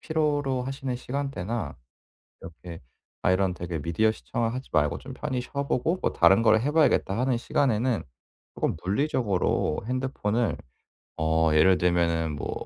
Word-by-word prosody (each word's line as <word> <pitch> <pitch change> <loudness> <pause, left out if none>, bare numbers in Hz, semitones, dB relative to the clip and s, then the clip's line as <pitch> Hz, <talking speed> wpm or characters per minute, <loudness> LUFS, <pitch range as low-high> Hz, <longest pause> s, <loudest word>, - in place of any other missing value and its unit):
필요로 145 -5 0
하시는 135 -1 -4
시간대나 120 - -4 0.7
이렇게 85 0 -10 0.4
아 90 - +3
이런 95 -1 +2
되게 85 -2 -5
'미디어 85 +8 +1
시청을 115 +1 -3
하지 130 +1 -6
말고 75 -1 +2
좀 130 - -9
편히 130 -2 -3
쉬어보고 140 +6 -1
뭐 - - 0
다른 100 +4 +5
걸 110 -1 +5
해 145 +4 0
봐야겠다.' 145 -10 +2
하는 125 -1 +1
시간에는 120 -2 0 0.5
쪼금 - - -1
물리적으로 100 - 0
핸드폰을 120 -4 -1 0.6
어 80 0 +2
예를 90 +4 +5
들면은 85 -2 +1
뭐 - - -4
115 Hz, 320 characters per minute, -26 LUFS, 90-135 Hz, 0.7 s, 다른